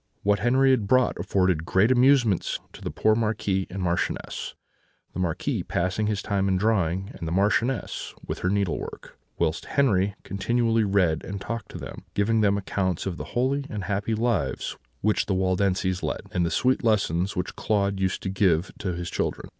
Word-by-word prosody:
"What 105 0 +3
Henri 130 +3 +4
had 115 -6 +2
brought 130 -2 +3
afforded 90 -3 +1
great 95 +7 +3
amusement 125 -6 +3 0.2
to - - -12
the - - -3
poor 110 - +2
Marquis 105 -4 0
and 95 0 -4
Marchioness; 85 -1 -2 0.6
the - - -5
Marquis 85 -3 -1
passing 90 +5 -1
his 105 -3 -1
time 100 -1 0
in 95 -1 +2
drawing, 95 -2 +1
and 80 - -6
the - - -3
Marchioness 105 +7 0
with - - -4
her 90 - 0
needlework, 100 -6 -2 0.2
whilst 80 +1 0
Henri 100 -8 +3
continually 115 +3 +1
read 95 -6 +2
and 100 +1 -5
talked 115 +2 -5
to - - -8
them, - - -8
giving 110 +2 +2
them 100 -1 +3
accounts 95 -3 -1
of 90 -3 -3
the - - -5
holy 135 +3 +1
and 105 -2 -4
happy 105 +3 -1
lives 105 - -1 0.3
which 105 +1 +1
the 95 - +1
Waldenses 95 0 +1
led, - - -2
and 90 - +1
the 85 - +1
sweet 130 +8 +1
lessons 100 -4 +1
which 90 0 -3
Claude 100 -2 0
used 95 -1 -1
to - - -2
give 95 -3 +2
to 95 -3 -2
his 85 0 -4
children. - - -3
100 Hz, 180 wpm, -26 LUFS, 95-110 Hz, 0.6 s, Henri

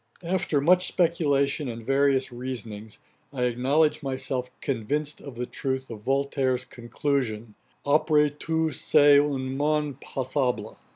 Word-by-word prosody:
After 170 -4 0
much 180 +5 +4
speculation 145 -4 +1
and 115 -1 -6
various 135 -1 +2
reasonings, 115 -4 -7 0.3
I 130 -3 -2
acknowledge 140 +6 +2
myself 130 -2 -3
convinced 145 +5 -2
of 140 -4 -9
the 125 +1 -3
truth 130 0 -4
of 110 -2 -8
Voltaire's 135 0 0
conclusion, 120 -2 -3 0.3
'Après 150 0 +3
tout 160 0 -1
c - - 0
èst 145 0 +6
un 130 0 -4
monde 150 -1 -1
passable.' 125 -4 -2
135 Hz, 125 wpm, -26 LUFS, 125-150 Hz, 0.3 s, èst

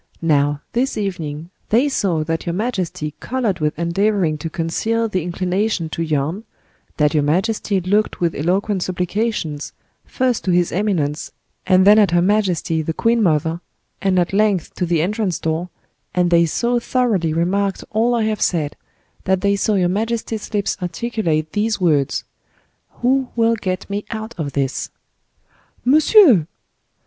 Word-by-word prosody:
Now, 145 -2 +2
this 255 +3 0
evening, 170 -5 -4 0.2
they 240 +7 +3
saw 185 - 0
that 165 +2 -3
your 170 - 0
majesty 180 -7 -3
colored 235 -7 -1
with 150 -1 -1
endeavoring 170 0 +1
to 165 - -4
conceal 220 +9 -1
the 185 -4 -1
inclination 180 +1 -1
to 165 - -4
yawn, 155 +5 -1 0.5
that 150 -1 +2
your 150 - +3
majesty 195 +6 0
looked 205 +4 0
with 170 -2 +1
eloquent 190 +5 0
supplications, 180 -4 -2 0.3
first 255 -3 -1
to 185 - +2
his 175 -1 +2
eminence, 170 -7 -1 0.4
and 185 0 +5
then 210 +2 +7
at 205 -3 +4
her 175 +1 +3
majesty, 185 -5 +1
the 160 +1 -3
queen 230 0 +2
mother, 160 -2 +1 0.4
and 190 -1 +1
at 180 +1 +1
length 200 -4 +1
to 180 - -2
the 165 -2 +1
entrance 205 -1 -1
door, 160 +2 -2 0.5
and 180 -1 +2
they 170 0 +5
so 240 +8 0
thoroughly 230 -10 0
remarked 190 +5 0
all 235 +3 +2
I 230 - +1
have 215 -1 -1
said, 155 -5 0 0.5
that 190 0 +1
they 200 +1 +2
saw 205 +2 +1
your 180 -2 +2
majesty's 220 +2 -2
lips 205 -2 -1
articulate 175 -4 -2
these 215 +1 0
words: 150 -6 +1 0.8
'Who 260 +1 +2
will 230 0 +3
get 185 -4 -3
me 205 +1 -4
out 220 0 -5
of 145 -3 -3
this?'" 140 -1 -2 1.0
"Monsieur!" 285 - +6
185 Hz, 155 wpm, -20 LUFS, 165-215 Hz, 1.0 s, then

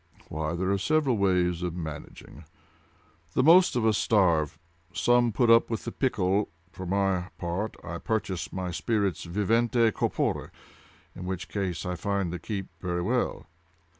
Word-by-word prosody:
"Why, 80 +2 -2
there 95 +2 -1
are 100 - +1
several 145 +3 +2
ways 90 -3 +1
of 90 -1 -3
managing. 80 -1 -8 0.9
The 130 - +2
most 175 +3 +6
of 120 -3 +1
us 110 -2 +3
starve: 85 -8 +2 0.3
some 120 +7 +3
put 115 +1 +3
up 115 0 +5
with 115 -2 -3
the - - -3
pickle: 100 -6 0 0.2
for 95 -1 -7
my 95 -1 0
part 90 +5 -3
I 85 -1 -5
purchase 100 -4 -2
my 95 -1 -3
spirits 100 0 -1
vivente 115 +5 +2
corpore, - - -1 0.7
in 90 - -7
which 95 0 -4
case 95 -4 -3
I 90 - -2
find 95 0 -2
they 90 - -4
keep 95 +2 -4
very 90 -1 -2
well." 120 +6 -1
95 Hz, 155 wpm, -27 LUFS, 90-110 Hz, 0.9 s, most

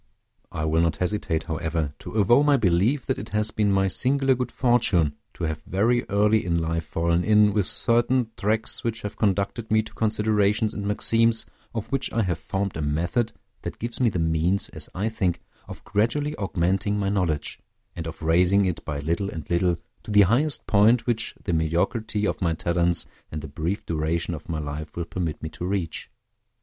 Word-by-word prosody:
I 75 - -3
will 80 +1 +2
not 85 -3 +1
hesitate, 90 -2 -1
however, 80 -2 -2
to - - -9
avow 110 +5 +4
my 145 -1 +4
belief 105 +6 +2
that - - -1
it - - -7
has 105 +1 +1
been 105 -2 +1
my 95 0 +2
singular 135 +6 +2
good 125 0 -3
fortune 110 - +2 0.2
to - - -6
have 80 -1 -2
very 115 +8 0
early 105 +2 +3
in 85 -1 0
life 80 0 -1
fallen 85 +2 0
in 105 0 +4
with 100 -3 +1
certain 120 0 +1
tracks 110 +2 -1
which 115 -1 -3
have 105 - -5
conducted 100 +2 -1
me 110 0 +3
to - - -13
considerations 105 0 +1
and 100 -1 -4
maxims, 115 +2 +3 0.3
of 115 +2 -4
which 135 -1 -1
I 115 - +1
have 90 -4 -2
formed 100 -1 -3
a 80 - -3
method 85 +11 -1 0.3
that - - -6
gives 120 +1 -5
me 120 - +4
the 95 - -3
means, 80 +3 +1
as - - -7
I 100 +4 -1
think, 95 -6 -1 0.3
of - - -10
gradually 130 +9 0
augmenting 95 - 0
my 100 -1 0
knowledge, 90 -7 -1 0.4
and 80 -1 -5
of 80 0 -8
raising 90 +5 +4
it 85 -3 -2
by 75 -2 -4
little 85 +6 -1
and 80 -5 -7
little 85 0 +2 0.2
to - - -13
the 105 -1 +6
highest 125 +10 +2
point 110 +4 +4
which 115 -3 -1
the 90 - -2
mediocrity 105 +7 0
of - - -2
my 85 -2 +1
talents 85 +1 +4 0.3
and 75 - -5
the - - -6
brief 80 +8 -3
duration 85 +2 -1
of 80 -1 -8
my 80 - -2
life 75 0 -6
will 85 - -2
permit 85 -3 -4
me 80 - -3
to 85 - -9
reach. 90 -4 -3
100 Hz, 195 wpm, -25 LUFS, 85-110 Hz, 0.4 s, the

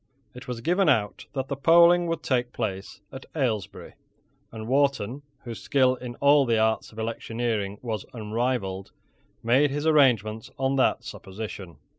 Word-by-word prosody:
It 125 - -11
was 125 -2 -5
given 180 +8 +2
out 105 -2 0
that 135 -1 -3
the 140 - -3
polling 170 +4 +5
would 165 -1 -3
take 125 -2 -1
place 95 -1 -5
at 130 - -10
Ailesbury; 120 - -3 0.6
and 110 -1 -7
Wharton, 135 -2 +1 0.2
whose 120 -2 -7
skill 130 -2 +3
in 125 -1 -8
all 140 +1 +5
the 115 -3 +1
arts 110 0 0
of 110 - -17
electioneering 115 -2 -3
was 110 -5 -3
unrivalled, 110 -4 -3 0.5
made 130 +6 +3
his 145 +2 -3
arrangements 115 -8 +3
on 135 0 0
that 130 - +2
supposition. 95 -3 -8
120 Hz, 150 wpm, -26 LUFS, 110-140 Hz, 0.6 s, polling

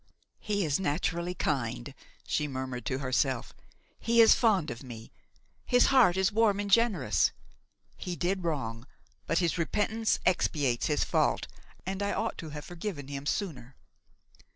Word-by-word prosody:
"He 205 -3 -1
is 145 0 +1
naturally 175 +1 -1
kind," 115 - -2 0.3
she 150 - -1
murmured 130 -2 -5
to 130 - -1
herself; 130 -1 -1 0.5
"he 235 +1 +2
is 225 -1 +9
fond 200 - +2
of 115 - -7
me; 115 -4 -10 0.5
his 245 -1 +4
heart 230 -9 +5
is 190 +1 +2
warm 215 -2 +2
and 205 -1 -3
generous. 210 - +3 0.7
He 180 -1 -4
did 185 +2 -1
wrong, 125 -7 -3 0.4
but 165 - +1
his 170 -1 +1
repentance 220 +6 0
expiates 145 -8 +1
his 150 -1 +1
fault, - - +1 0.4
and 190 +1 -3
I 200 0 0
ought - - -2
to 160 - -6
have 150 -1 -7
forgiven 170 -6 -6
him 140 0 -5
sooner." 135 - -3
165 Hz, 150 wpm, -29 LUFS, 135-200 Hz, 0.7 s, is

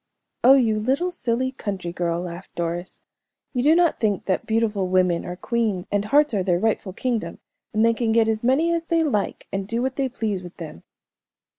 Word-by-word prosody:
"Oh, 265 +2 +8
you 225 -5 +2
little 275 +11 0
silly 255 -5 -1
country 195 -8 -5
girl," 170 -1 -1
laughed 175 +1 -8
Doris, 170 +1 -4 0.5
"you 250 - 0
do 300 +5 +5
not 340 -2 +3
think 205 -4 0
that 185 - -1
beautiful 220 -4 +1
women 180 -2 +2
are 175 - -5
queens, 215 -3 -1
and 205 0 0
hearts 290 +3 +3
are 200 - +1
their 180 -2 +1
rightful 205 -1 -1
kingdom, 240 +1 -2 0.3
and 220 +1 +2
they 230 - +4
can 230 -1 0
get 225 0 +4
as 220 0 -1
many 295 +8 +3
as 335 0 -1
they 330 -1 +2
like, 215 -10 -2
and 195 0 -2
do 230 +2 -1
what 260 0 -2
they 270 -2 0
please 215 -6 -2
with 175 -1 -11
them." 155 - -8
220 Hz, 200 wpm, -23 LUFS, 185-260 Hz, 0.5 s, Oh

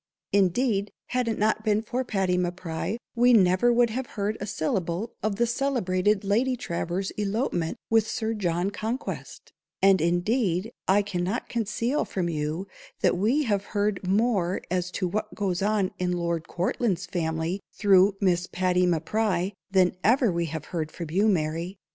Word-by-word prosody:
Indeed, 200 +2 +2 0.2
had 250 -1 0
it 225 - -1
not 215 +1 +1
been 215 0 +1
for 250 +3 -2
Patty 195 -6 0
M'Pry, 180 +2 -2 0.2
we 245 +1 +5
never 190 +2 +5
would 240 -1 +3
have 255 +2 -3
heard 205 +1 0
a 205 - -4
syllable 180 +5 -2
of 215 -1 0
the 235 - +2
celebrated 215 -6 +1
_Lady 235 +6 +1
_Travers's 175 0 -3
elopement 205 -3 -1
with 225 -1 +4
Sir 225 -2 -2
John 180 -2 -1
Conquest; 225 +6 -5 0.3
and, 195 -2 +5
indeed, 180 +3 +1 0.2
I 200 +2 +4
cannot 195 +3 -2
conceal 235 +4 -1
from 180 -3 -2
you, 155 +4 -3 0.3
that - - +3
we 230 +11 +2
have 205 -6 0
heard 205 -2 +1
more 195 -3 +1
as 180 -1 0
to 185 - -1
what 215 +4 -3
goes 190 -4 -1
on 205 -2 +1
in 180 0 0
Lord 170 -2 -2
Courtland's 185 +1 -1
family 165 0 -2
through 195 -1 +4
Miss 180 -2 +1
Patty 180 0 +1
M'Pry, 185 +3 0 0.2
than 185 -2 +3
ever 235 0 +4
we 170 0 -1
have 155 0 -5
heard 160 -2 -2
from 165 -3 -7
you, 200 +6 +3
_Mary. 165 -1 0
195 Hz, 160 wpm, -26 LUFS, 175-220 Hz, 0.3 s, we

